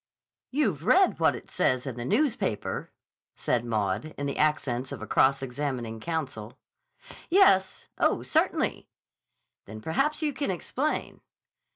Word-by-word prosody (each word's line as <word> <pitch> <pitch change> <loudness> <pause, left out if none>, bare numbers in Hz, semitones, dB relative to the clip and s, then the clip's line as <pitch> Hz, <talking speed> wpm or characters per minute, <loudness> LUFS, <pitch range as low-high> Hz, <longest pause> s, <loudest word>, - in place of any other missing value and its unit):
"You've 215 - 0
read 370 - +4
what - - +3
it - - -11
says 130 0 +1
in 130 -4 -4
the 120 - -5
newspaper?" 215 - -1 0.4
said 120 - 0
Maud, 110 +5 -2
in 145 - -3
the 140 - -2
accents 135 -4 0
of - - -6
a 110 - -6
cross 135 +4 +3
examining 125 -4 -4
counsel. 130 -7 -4 0.7
"Yes. 330 - +4
Oh, - - +2
certainly!" - - 0 0.8
"Then 110 +2 -9
perhaps 275 - 0
you 295 -2 0
can 280 -2 -2
explain." 260 - -2
145 Hz, 135 wpm, -27 LUFS, -, 0.8 s, read